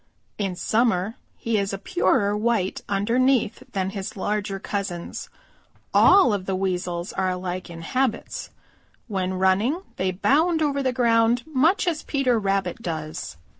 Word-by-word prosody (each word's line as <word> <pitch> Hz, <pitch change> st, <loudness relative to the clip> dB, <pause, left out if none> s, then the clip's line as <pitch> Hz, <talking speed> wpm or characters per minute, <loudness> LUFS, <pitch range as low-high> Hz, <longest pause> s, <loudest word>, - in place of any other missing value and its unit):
In 195 Hz, -3 st, -1 dB
summer 220 Hz, -1 st, +1 dB, 0.2 s
he 230 Hz, -2 st, 0 dB
is 200 Hz, 0 st, -2 dB
a -, -, -2 dB
purer 200 Hz, +1 st, +1 dB
white 210 Hz, -3 st, 0 dB
underneath 235 Hz, +4 st, +2 dB
than 190 Hz, -1 st, -1 dB
his 200 Hz, +3 st, -6 dB
larger 205 Hz, 0 st, -2 dB
cousins. 190 Hz, -3 st, -4 dB, 0.6 s
All 320 Hz, -, +6 dB
of 190 Hz, -2 st, -3 dB
the 190 Hz, -, 0 dB
Weasels 180 Hz, -2 st, -2 dB
are 190 Hz, -1 st, 0 dB
alike 180 Hz, 0 st, -4 dB
in 165 Hz, -1 st, -8 dB
habits. 255 Hz, +5 st, -2 dB, 0.6 s
When 190 Hz, -3 st, -2 dB
running 200 Hz, -, +2 dB
they 185 Hz, 0 st, 0 dB
bound 315 Hz, -, +2 dB
over 280 Hz, -2 st, 0 dB
the 260 Hz, -1 st, +1 dB
ground 235 Hz, -1 st, +3 dB
much 315 Hz, +6 st, +2 dB
as 330 Hz, -3 st, 0 dB
Peter 255 Hz, -5 st, +1 dB
Rabbit 195 Hz, +1 st, -1 dB
does. 155 Hz, -, -5 dB
205 Hz, 140 wpm, -24 LUFS, 185-245 Hz, 0.6 s, All